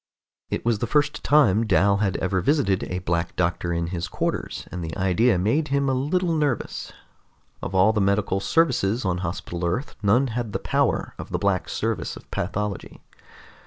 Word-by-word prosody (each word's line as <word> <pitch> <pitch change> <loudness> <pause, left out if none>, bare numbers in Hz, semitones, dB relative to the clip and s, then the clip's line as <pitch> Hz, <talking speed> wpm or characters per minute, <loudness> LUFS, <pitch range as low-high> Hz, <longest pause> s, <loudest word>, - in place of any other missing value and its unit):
It - - -3
was 115 -3 +2
the 120 - -1
first 150 +3 +1
time 115 -7 +4
Dal 100 -1 +4
had 100 -2 0
ever 95 0 0
visited 135 - +1
a 90 - -4
Black 85 0 -1
Doctor 85 -1 0
in 85 0 -1
his 85 0 -2
quarters, - - -3
and 90 -1 -5
the 80 +2 -5
idea 95 +4 +3
made 115 - +1
him 140 0 +1
a 135 - +2
little 165 +7 0
nervous. 150 -6 -1 0.7
Of 95 - -4
all 95 +4 +5
the 105 - +1
medical 100 0 +1
services 125 -5 +1
on 90 -1 0
Hospital 85 0 -4
Earth, 90 +12 -1
none 120 +6 +3
had 115 -3 -3
the - - +1
power - - 0
of - - -7
the - - -1
Black 100 -2 0
Service - - -2
of - - -16
Pathology. 100 +2 -3
100 Hz, 180 wpm, -24 LUFS, 90-130 Hz, 0.7 s, all